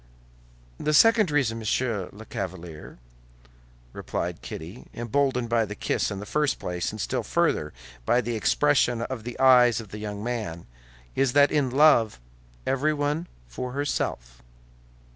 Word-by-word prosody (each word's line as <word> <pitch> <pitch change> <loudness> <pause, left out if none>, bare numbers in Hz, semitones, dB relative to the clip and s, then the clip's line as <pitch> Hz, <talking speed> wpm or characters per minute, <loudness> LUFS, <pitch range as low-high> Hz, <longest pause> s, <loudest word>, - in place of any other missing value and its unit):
"The 150 0 +1
second 225 +1 +6
reason, 130 -6 +1
Monsieur 110 -3 -1
the 110 +2 -12
Chevalier," 90 -4 -7 1.0
replied - - -4
Kitty, 85 +10 -8
emboldened 125 +1 0
by 115 -1 +2
the 105 -1 -6
kiss - - -1
in 100 -2 -5
the 105 - -7
first 150 +5 0
place, 90 -1 -3
and 110 - -8
still - - -1
further 75 0 0 0.3
by 120 - +3
the 120 -1 -2
expression 120 0 +2
of 120 -2 -5
the 120 - -7
eyes 125 -3 +6
of 110 -3 -9
the 105 - -8
young 105 -1 -5
man, 110 -9 -4 0.5
"is 135 -2 +2
that 145 0 +5
in 145 -4 +1
love, 125 - +4 0.5
everyone 150 +4 0 0.2
for 125 - -6
herself!" 60 - -3
120 Hz, 145 wpm, -26 LUFS, 105-140 Hz, 1.0 s, second